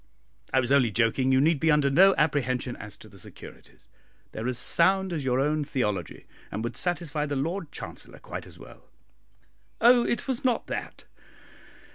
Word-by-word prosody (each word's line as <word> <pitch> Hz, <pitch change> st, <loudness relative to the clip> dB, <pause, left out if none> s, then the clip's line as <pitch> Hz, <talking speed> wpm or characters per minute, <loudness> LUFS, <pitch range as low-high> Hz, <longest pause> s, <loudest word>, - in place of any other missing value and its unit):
"I 130 Hz, -, +3 dB
was 130 Hz, 0 st, -1 dB
only 135 Hz, -4 st, +4 dB
joking; 115 Hz, +4 st, +1 dB
you 130 Hz, -, +4 dB
need 155 Hz, +2 st, +3 dB
be 160 Hz, -, +1 dB
under 150 Hz, -3 st, +3 dB
no 190 Hz, +6 st, +6 dB
apprehension 130 Hz, -5 st, 0 dB
as 105 Hz, -1 st, -10 dB
to -, -, -15 dB
the -, -, -15 dB
securities -, -, -14 dB, 0.4 s
they -, -, -8 dB
are 115 Hz, -, -3 dB
as 125 Hz, -1 st, -1 dB
sound 190 Hz, +7 st, +2 dB
as 155 Hz, -4 st, -3 dB
your 130 Hz, -1 st, +1 dB
own 150 Hz, +2 st, +1 dB
theology, 105 Hz, -, -3 dB, 0.2 s
and 105 Hz, +3 st, -5 dB
would 120 Hz, 0 st, -4 dB
satisfy 165 Hz, -4 st, -1 dB
the 145 Hz, -, -3 dB
Lord 165 Hz, +4 st, -3 dB
Chancellor -, -, -9 dB
quite -, -, -8 dB
as -, -, -14 dB
well." -, -, -15 dB, 0.9 s
"Oh, 240 Hz, +1 st, +6 dB
it 235 Hz, -, -2 dB
was 260 Hz, -3 st, -2 dB
not 250 Hz, -3 st, +1 dB
that! -, -, -6 dB
145 Hz, 180 wpm, -26 LUFS, 125-170 Hz, 0.9 s, no